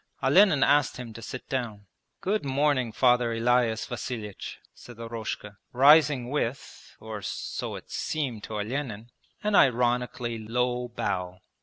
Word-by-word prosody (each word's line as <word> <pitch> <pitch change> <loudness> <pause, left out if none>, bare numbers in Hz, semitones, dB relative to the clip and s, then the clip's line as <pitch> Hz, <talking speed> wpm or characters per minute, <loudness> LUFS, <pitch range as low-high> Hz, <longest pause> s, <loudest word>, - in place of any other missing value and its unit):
Olenin 155 +1 +5
asked 145 -1 +3
him 120 -2 -7
to 115 - -10
sit 130 - -7
down. 115 -6 -3 0.4
'Good 210 +3 0
morning. 135 -3 +1
Father 120 +1 +3
Elias 115 -1 +2
Vasilich,' 110 -3 -6 0.2
said 120 -2 -13
Eroshka, 115 -3 -6 0.2
rising 140 -1 +5
with 140 -2 -4
(or 110 -1 -7
so - - -4
it - - -11
seemed 130 -9 -3
to 110 - -6
Olenin) 115 0 -4 0.3
an 210 0 0
ironically 125 - +2
low 125 +2 -1
bow. 90 -6 -3
120 Hz, 130 wpm, -27 LUFS, 115-135 Hz, 0.4 s, Olenin